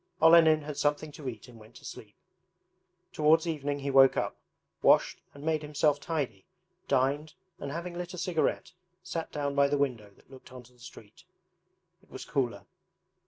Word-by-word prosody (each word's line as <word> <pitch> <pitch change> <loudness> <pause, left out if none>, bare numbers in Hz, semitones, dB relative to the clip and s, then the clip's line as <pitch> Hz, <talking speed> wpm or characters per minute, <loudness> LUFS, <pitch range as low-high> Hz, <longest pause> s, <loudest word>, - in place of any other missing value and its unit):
Olenin 160 -1 +6
had 150 -1 -7
something 150 +1 0
to 140 -2 -6
eat 115 -2 -10
and 120 -2 -15
went 110 0 -17
to - - -14
sleep. - - -10 1.0
Towards 155 +2 +3
evening 145 -3 -2
he 140 0 -3
woke 135 -1 +6
up, - - -1 0.5
washed - - +3
and 140 - -11
made 155 -1 0
himself 150 -1 +1
tidy, 135 - -4 0.4
dined, 140 +4 0 0.2
and 140 - -5
having 170 +3 -5
lit 180 +1 -6
a - - -10
cigarette 180 0 -1 0.3
sat 170 -3 -5
down 145 -1 -2
by 140 0 +4
the 145 +1 0
window 125 -7 -2
that - - -25
looked 130 -1 -14
onto 125 -1 -13
the 125 - -26
street. 110 -3 -14 0.8
It - - -27
was - - -9
cooler. 120 -7 -2
145 Hz, 170 wpm, -29 LUFS, 130-155 Hz, 1.0 s, Olenin